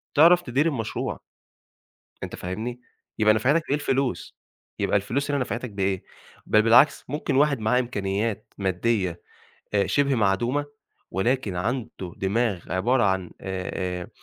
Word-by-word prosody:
تعرف 170 +4 +7
تدير 135 -1 0
المشروع. 115 -8 -3 1.0
أنت - - -5
فاهمني، 110 +7 -5 0.4
يبقى 110 0 +5
نفعتك 130 +10 +2
بإيه 140 - +2
الفلوس؟ 135 -3 -1 0.4
يبقى - - +2
الفلوس 130 +9 -2
هنا 145 - +1
نفعتك 125 -1 -3
بإيه؟ 95 -2 -1 0.4
بل 110 - +4
بالعكس، 120 +6 +5
ممكن 150 0 -2
واحد 140 -1 +3
معاه 110 +3 +2
إمكانيات 105 -2 -2
مادّية 95 -2 0 0.5
آآ 100 - +3
شِبه 140 -1 +2
معدومة 120 +7 +1 0.4
ولكن 105 0 0
عنده 105 -3 -3
دماغ 100 -1 -1
عبارة 120 +8 +2
عن 95 -3 0
آآ 95 -1 -4 0.3
آآ - - -9
115 Hz, 130 wpm, -25 LUFS, 95-130 Hz, 1.0 s, تعرف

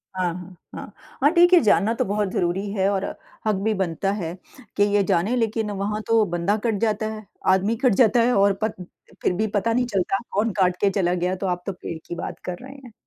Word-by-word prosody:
हाँ, 180 -2 0
हाँ, 180 +1 -10 0.2
हाँ। - - -8 0.3
हाँ, 285 - +6
ठीक 350 +1 +5
है, 355 - +9
जानना 215 +1 +3
तो - - -1
बहुत 205 0 -1
ज़रूरी 185 +3 -1
है 195 -1 +1
और 195 -1 -1 0.4
हक 215 - +2
भी 220 0 +1
बनता 190 0 -1
है 165 0 -4 0.4
कि 205 - +5
ये 205 0 +2
जानें 195 +6 +1
लेकिन 220 -2 -1
वहाँ 205 +2 -2
तो 225 -1 +4
बंदा 175 +3 0
कट 225 -3 +1
जाता 215 -1 0
है, 215 -1 -9 0.3
आदमी 195 +4 +1
कट 250 -5 +5
जाता 235 0 +4
है 245 +2 +3
और 200 0 +4
पर 220 - +1 0.5
फ़िर - - +1
भी 215 +4 0
पता 225 +3 +1
नहीं 250 +1 +1
चलता 195 -4 0
कौन 215 +3 +1
काट 180 -1 +3
के 200 - +4
चला 185 -3 0
गया। 180 +1 -1
तो 190 +1 -3
आप 180 0 -2
तो 195 - -3
पेड़ 170 -2 -7
की 175 - -5
बात - - -6
कर 180 -1 -4
रहे 270 +1 -10
हैं। 260 -4 -13
200 Hz, 235 wpm, -23 LUFS, 185-220 Hz, 0.5 s, है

